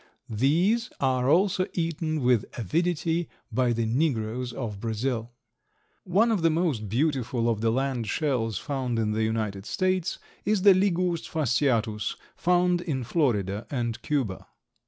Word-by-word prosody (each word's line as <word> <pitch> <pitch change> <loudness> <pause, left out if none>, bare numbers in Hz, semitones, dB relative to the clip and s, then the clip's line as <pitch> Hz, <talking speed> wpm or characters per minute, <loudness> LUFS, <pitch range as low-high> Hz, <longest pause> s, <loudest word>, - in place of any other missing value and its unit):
These 175 - +2
are 130 -1 +1
also 185 +3 +3
eaten 165 -2 -1
with 125 -4 +3
avidity 165 - 0 0.2
by 125 -2 +2
the 115 -1 0
negroes 120 -2 0
of 110 -6 -5
Brazil. 115 +1 -2 0.7
One 205 +6 +3
of 210 -5 +1
the 165 - +4
most 155 - 0
beautiful 125 -2 0
of 115 -3 0
the 115 - +2
land 130 -1 -1
shells 115 - 0
found 130 -3 -2
in 110 -1 0
the 110 +1 0
United 110 -3 -2
States 185 -1 0 0.3
is 210 -2 +1
the 200 -1 +9
Liguus 180 -3 +1
fasciatus, 120 -7 0 0.2
found 180 0 +2
in 140 -7 -2
Florida 110 - 0
and 120 -4 -2
Cuba. 130 -11 -2
130 Hz, 135 wpm, -27 LUFS, 115-170 Hz, 0.7 s, the